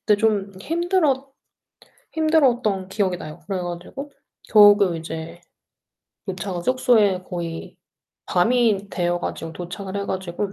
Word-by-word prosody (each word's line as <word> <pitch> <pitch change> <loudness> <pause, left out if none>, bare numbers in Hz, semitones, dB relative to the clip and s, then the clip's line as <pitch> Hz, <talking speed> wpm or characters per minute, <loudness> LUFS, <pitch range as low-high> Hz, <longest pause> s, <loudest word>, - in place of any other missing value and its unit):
그때 210 -2 +3
좀 205 -2 +1
힘들어 320 - 0 0.8
힘들었던 250 -12 +2
기억이 190 -2 -1
나요. 155 -2 -9
그래 195 -2 -2
가지고 175 +12 -6 0.4
겨우 205 -1 +8
그 185 -5 +1
이제 165 +1 -7 0.9
도착한 185 -2 -4
숙소에 225 -7 +3
거의 170 -2 -6 0.5
밤이 210 0 +2
되어 175 -1 0
가지고 165 -1 -5
도착을 190 +3 -6
해 200 - -3
가지고 190 +2 -3
200 Hz, 270 characters per minute, -22 LUFS, 175-240 Hz, 0.9 s, 겨우